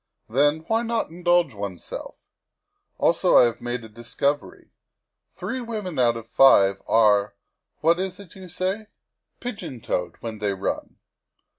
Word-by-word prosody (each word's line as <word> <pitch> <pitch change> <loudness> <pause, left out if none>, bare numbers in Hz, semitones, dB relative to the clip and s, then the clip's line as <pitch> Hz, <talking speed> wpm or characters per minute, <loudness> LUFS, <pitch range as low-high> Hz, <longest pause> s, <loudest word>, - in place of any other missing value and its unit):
Then, 145 +6 +2
why 225 +8 0
not 230 -6 -2
indulge 175 -4 +2
oneself? 100 -3 -7 0.8
Also, - - +3
I - - +8
have 120 -1 0
made 120 0 -4
a - - -9
discovery; 120 +6 -3 0.6
three 260 -1 -4
women 210 - -4
out 120 -2 +3
of 115 -1 -9
five 100 -8 +5
are 105 -2 +3 0.5
what 165 +3 +3
is 190 0 -3
it 200 -4 -13
you 190 -2 -11
say? 190 +5 -3 0.5
pigeon 185 - -6
toed 90 -7 -3
when 110 -2 -6
they 105 -1 0
run. 95 - -4
140 Hz, 140 wpm, -24 LUFS, 110-185 Hz, 0.8 s, I